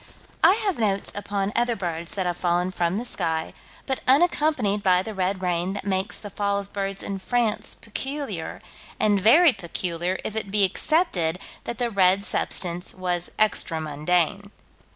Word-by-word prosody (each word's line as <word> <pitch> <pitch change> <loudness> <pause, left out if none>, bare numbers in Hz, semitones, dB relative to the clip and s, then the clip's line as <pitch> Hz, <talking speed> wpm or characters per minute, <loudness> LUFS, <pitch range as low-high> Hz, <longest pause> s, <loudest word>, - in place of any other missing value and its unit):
I - - +8
have 385 -10 0
notes 200 -3 +1
upon 200 -1 -2
other 240 0 +2
birds 170 -1 -4
that 190 -2 -1
have 175 -1 0
fallen 175 +1 +1
from 175 +1 0
the 235 - -3
sky, 160 -7 -2 0.3
but 265 - -1
unaccompanied 275 - +3
by 185 -2 +3
the 220 - -6
red 190 0 -1
rain 180 +1 0
that 205 - -6
makes 190 0 -1
the 205 - -8
fall 200 0 0
of 200 0 -6
birds 195 -1 -3
in 195 -1 -4
France 235 +1 -1
peculiar, 270 +6 -5 0.4
and 205 -2 +3
very 290 - +7
peculiar, 175 -1 -3
if 215 - -4
it 215 -3 -2
be 205 0 +2
accepted 190 - +1 0.3
that 235 - -4
the 240 -1 -1
red 195 -1 +4
substance 180 -3 -1
was 180 -2 -2
extra 210 -6 +2
mundane. 165 +6 0
195 Hz, 165 wpm, -25 LUFS, 180-215 Hz, 0.4 s, I